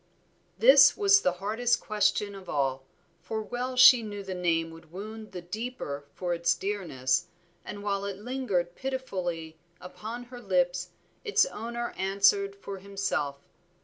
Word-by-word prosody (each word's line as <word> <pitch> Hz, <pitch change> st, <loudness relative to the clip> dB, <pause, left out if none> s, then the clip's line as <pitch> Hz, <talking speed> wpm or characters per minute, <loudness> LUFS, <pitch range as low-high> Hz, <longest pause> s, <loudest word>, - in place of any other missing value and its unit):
This -, -, +7 dB
was 400 Hz, -1 st, +5 dB
the 180 Hz, -, +1 dB
hardest 220 Hz, +6 st, 0 dB
question 210 Hz, -1 st, 0 dB
of 195 Hz, -2 st, -11 dB
all, 135 Hz, -2 st, 0 dB, 0.4 s
for 220 Hz, -, -4 dB
well 250 Hz, +3 st, -4 dB
she 250 Hz, -1 st, +9 dB
knew 205 Hz, -2 st, -6 dB
the 190 Hz, -1 st, -5 dB
name 165 Hz, -2 st, 0 dB
would 165 Hz, -1 st, -14 dB
wound 215 Hz, +4 st, -8 dB
the 180 Hz, -, -7 dB
deeper 180 Hz, -, -5 dB
for 180 Hz, -1 st, -2 dB
its 170 Hz, 0 st, +2 dB
dearness, 175 Hz, -6 st, -1 dB, 0.4 s
and 205 Hz, 0 st, -8 dB
while 200 Hz, -1 st, -1 dB
it 200 Hz, -1 st, -4 dB
lingered 205 Hz, -7 st, -2 dB
pitifully 180 Hz, -12 st, -4 dB, 0.2 s
upon 220 Hz, +6 st, -7 dB
her 245 Hz, 0 st, -11 dB
lips 180 Hz, -3 st, 0 dB, 0.3 s
its 425 Hz, 0 st, +3 dB
owner 235 Hz, -, -5 dB
answered 200 Hz, +1 st, +2 dB
for 200 Hz, -1 st, -8 dB
himself. 185 Hz, -8 st, -3 dB
200 Hz, 145 wpm, -28 LUFS, 175-230 Hz, 0.4 s, she